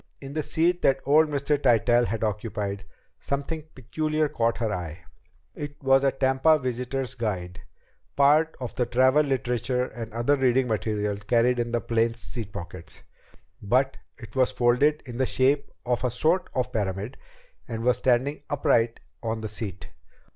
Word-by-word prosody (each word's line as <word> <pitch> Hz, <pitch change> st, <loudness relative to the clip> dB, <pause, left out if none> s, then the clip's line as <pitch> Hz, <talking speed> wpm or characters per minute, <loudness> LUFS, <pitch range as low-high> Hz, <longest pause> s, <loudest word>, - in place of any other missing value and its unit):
In 135 Hz, 0 st, -8 dB
the 155 Hz, -, -1 dB
seat 170 Hz, +4 st, +1 dB
that 135 Hz, -, +3 dB
old 155 Hz, +3 st, +5 dB
Mr. 145 Hz, 0 st, 0 dB
Tytell 120 Hz, -1 st, +4 dB
had 115 Hz, 0 st, -3 dB
occupied 105 Hz, -2 st, -3 dB, 0.3 s
something 145 Hz, +3 st, -3 dB
peculiar 155 Hz, +4 st, -1 dB
caught 115 Hz, -4 st, 0 dB
her 115 Hz, -2 st, -1 dB
eye. 85 Hz, -4 st, -6 dB, 0.5 s
It 145 Hz, 0 st, -6 dB
was 135 Hz, 0 st, +4 dB
a 135 Hz, -, +4 dB
Tampa 135 Hz, +4 st, +3 dB
visitor's 125 Hz, 0 st, -3 dB
guide, 95 Hz, -6 st, -4 dB, 0.6 s
part 150 Hz, +3 st, +4 dB
of 125 Hz, -2 st, -5 dB
the 125 Hz, -, -1 dB
travel 130 Hz, +4 st, +4 dB
literature 125 Hz, -2 st, 0 dB
and 115 Hz, -2 st, -8 dB
other 120 Hz, +6 st, +2 dB
reading 130 Hz, -1 st, +2 dB
matter 105 Hz, -1 st, -1 dB
carried 120 Hz, +4 st, +2 dB
in 120 Hz, 0 st, -1 dB
the 120 Hz, -1 st, 0 dB
plane's 115 Hz, 0 st, 0 dB
seat 110 Hz, -3 st, -6 dB
pockets. 85 Hz, -2 st, -9 dB, 0.6 s
But 130 Hz, +6 st, +1 dB, 0.2 s
it 115 Hz, -, -12 dB
was 130 Hz, -1 st, +3 dB
folded 130 Hz, +5 st, +2 dB
in 120 Hz, -2 st, -7 dB
the 130 Hz, 0 st, +1 dB
shape 140 Hz, +2 st, +2 dB, 0.2 s
of 125 Hz, 0 st, 0 dB
a 125 Hz, -, +2 dB
sort 160 Hz, +9 st, +1 dB
of 125 Hz, -, -1 dB
pyramid 100 Hz, +1 st, -2 dB, 0.5 s
and 115 Hz, -3 st, -4 dB
was 125 Hz, 0 st, +3 dB
standing 130 Hz, +3 st, +1 dB
upright 115 Hz, -5 st, +1 dB, 0.2 s
on 110 Hz, -1 st, -3 dB
the 110 Hz, -, -3 dB
seat. 100 Hz, -4 st, -7 dB
125 Hz, 160 wpm, -26 LUFS, 115-140 Hz, 0.6 s, old